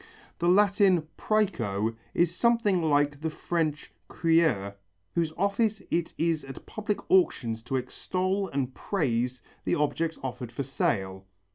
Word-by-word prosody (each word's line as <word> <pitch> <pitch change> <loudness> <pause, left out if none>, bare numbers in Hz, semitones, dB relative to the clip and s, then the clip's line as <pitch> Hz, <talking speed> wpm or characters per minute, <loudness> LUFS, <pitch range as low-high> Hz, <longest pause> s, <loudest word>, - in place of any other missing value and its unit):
The 175 +1 +2
Latin 195 -3 +4
præco 115 - 0 0.2
is 170 0 +2
something 230 -5 +3
like 145 -2 +2
the 160 - -1
French 155 -1 -2
crieur 160 - +2 0.4
whose 165 -2 0
office 205 +3 +1
it 170 -1 -1
is 165 -2 +1
at 135 -1 -10
public 210 -1 -2
auctions 120 -11 +3
to 120 +4 -4
extol 185 +9 -1
and 135 -3 -2
praise 125 - -1 0.2
the - - +1
objects 160 +2 0
offered 125 -2 -5
for 130 +4 -3
sale. 95 -7 -1
160 Hz, 130 wpm, -28 LUFS, 125-185 Hz, 0.4 s, Latin